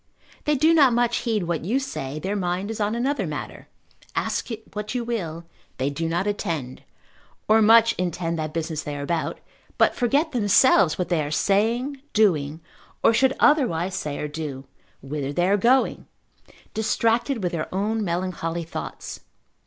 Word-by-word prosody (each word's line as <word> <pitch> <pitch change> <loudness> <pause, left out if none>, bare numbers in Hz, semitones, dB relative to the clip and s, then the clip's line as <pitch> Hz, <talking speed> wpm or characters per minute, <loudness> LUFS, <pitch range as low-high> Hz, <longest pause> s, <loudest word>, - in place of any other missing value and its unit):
They 300 -1 +2
do 310 +4 +4
not 280 -6 +6
much 240 0 +2
heed 220 -5 -1
what 170 -2 -2
you 220 +10 0
say, 150 - -5
their 190 +7 -3
mind 185 +2 -2
is 225 - -6
on 210 +2 0
another 245 - -1
matter; 150 -1 -6 0.5
ask - - -1 0.3
what 210 +3 -4
you 245 - 0
will, 170 -9 -4 0.3
they 135 +2 -1
do 165 +3 -2
not 175 +3 0
attend, 160 -10 -3 0.7
or 220 +1 +5
much 230 +1 +6
intend 170 -2 -2
that 155 -1 -3
business 160 -1 -3
they 150 -1 -5
are 140 - -4
about, 165 +2 -2 0.4
but - - +4
forget 280 +7 +1
themselves 205 - +4
what 180 - -2
they 170 -3 +2
are 145 - -4
saying, 230 - +1
doing, 160 -8 +2 0.4
or - - +6
should 265 +3 +3
otherwise 195 - +3
say 150 -5 -3
or 150 - -3
do, 145 -3 -6 0.4
whither 140 0 -3
they 175 +5 +1
are 200 - +4
going, 245 +6 +2 0.7
distracted 225 +2 0
with 175 - 0
their 160 -2 -4
own 210 +4 -1
melancholy 170 -2 -2
thoughts. 165 - -7
190 Hz, 165 wpm, -24 LUFS, 160-230 Hz, 0.7 s, not